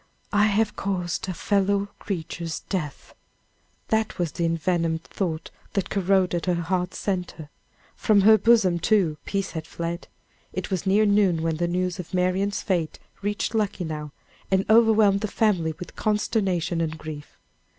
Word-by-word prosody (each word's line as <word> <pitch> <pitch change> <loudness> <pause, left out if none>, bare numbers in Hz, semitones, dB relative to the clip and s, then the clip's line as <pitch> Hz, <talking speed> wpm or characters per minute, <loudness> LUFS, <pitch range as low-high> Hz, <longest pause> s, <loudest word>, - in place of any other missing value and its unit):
"I 205 0 +5
have 215 +1 +1
caused 185 -2 -2
a - - -1
fellow 200 +1 +1
creature's 170 -3 -4
death!" 155 -8 -4 0.8
That 220 -1 0
was 175 -3 -1
the 170 - -1
envenomed 165 0 0
thought 165 -5 -4 0.2
that 195 - -1
corroded 190 -3 +1
her 180 - +3
heart's 180 +2 -1
centre. 180 -6 -3 0.4
From 210 -2 +3
her 220 +2 +7
bosom, 200 -5 +4
too, 175 -5 +2
peace 195 -1 -2
had 160 -1 -6
fled. 170 +1 -5 0.5
It - - -4
was 190 0 -1
near 205 +3 +4
noon 200 -5 +3
when 165 -1 0
the 175 +1 0
news 180 +1 -1
of 180 +1 -5
Marian's 185 +3 0
fate 175 -6 -1 0.2
reached 205 +3 -2
Luckenough, 170 -8 -2 0.4
and 190 0 +2
overwhelmed 220 -3 +5
the 215 - 0
family 185 -8 +1
with 180 - -9
consternation 195 -5 0
and 160 -1 -2
grief. 155 -2 -9
185 Hz, 150 wpm, -25 LUFS, 165-200 Hz, 0.8 s, her